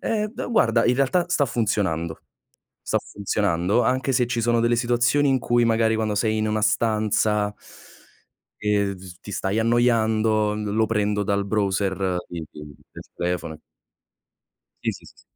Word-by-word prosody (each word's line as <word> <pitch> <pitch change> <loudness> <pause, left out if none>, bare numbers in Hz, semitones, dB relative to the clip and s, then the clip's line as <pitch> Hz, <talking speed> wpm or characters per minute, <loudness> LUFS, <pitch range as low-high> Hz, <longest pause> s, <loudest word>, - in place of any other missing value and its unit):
Eh 215 -1 -1
d - - -5
guarda, 115 - +3
in 120 - +3
realtà, 140 +7 +2
sta 165 -5 +2
funzionando, 95 -9 -1 0.6
sta - - 0
funzionando, 100 +1 0
anche 130 +3 0
se 125 -1 +2
ci 120 -1 -2
sono 120 0 +2
delle 120 +1 +2
situazioni 120 +4 +2
in 135 -1 +3
cui 120 +1 +2
magari 115 -1 +2
quando 110 -1 -1
sei 110 +1 +1
in 110 - 0
una 105 0 -1
stanza 105 -1 +1 1.1
...e 100 -1 +1
d - - -16
s 90 -2 -12
ti 100 - -9
stai 95 +2 -1
annoiando, 110 -2 +2
l 105 - -4
lo 110 0 +2
prendo 105 -1 0
dal 100 0 0
browser, 95 -2 0 0.2
i 85 -2 -5
i 75 -1 -11 0.2
del - - -10
telefono. 85 -3 -3 1.2
Sì, - - 0
sì, - - -13
sì. - - -18
110 Hz, 160 wpm, -23 LUFS, 100-120 Hz, 1.2 s, guarda